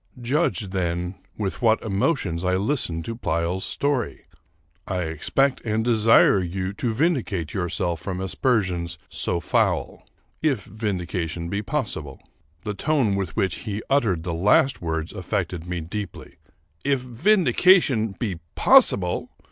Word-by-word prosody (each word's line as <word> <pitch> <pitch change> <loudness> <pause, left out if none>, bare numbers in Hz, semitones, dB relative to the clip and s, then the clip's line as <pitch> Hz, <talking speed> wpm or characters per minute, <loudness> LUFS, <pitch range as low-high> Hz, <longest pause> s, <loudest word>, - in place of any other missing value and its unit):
Judge, 125 - 0
then, 90 -1 -2 0.2
with 100 -3 -3
what 115 -2 +4
emotions 100 - 0
I 90 0 +2
listened 95 - 0
to 115 - -4
Pleyel's 90 -4 -1
story. 140 -4 -1 0.6
I 90 -2 -1
expect 105 - 0
and 110 0 -1
desire 115 -3 +5
you 95 +1 -3
to 115 +3 -2
vindicate 110 - 0
yourself 90 -3 -1
from 95 -2 -4
aspersions 95 -4 0
so 85 - -1
foul, 85 - 0 0.4
if 135 -10 +1
vindication 90 -5 -3
be 100 +3 -1
possible." 130 0 -4 0.4
The 105 - -3
tone 135 -2 +1
with 95 -5 -2
which 95 -3 0
he 105 -1 -5
uttered 110 -12 +2
the 85 -1 -3
last 105 +10 +3
words 80 -2 -3
affected 85 -1 -3
me 90 -1 -3
deeply. 95 +2 -7 0.5
"If 140 -2 +1
vindication 145 - +3
be 100 -8 -3 0.2
possible!" 90 -3 +4
100 Hz, 130 wpm, -24 LUFS, 90-120 Hz, 0.6 s, desire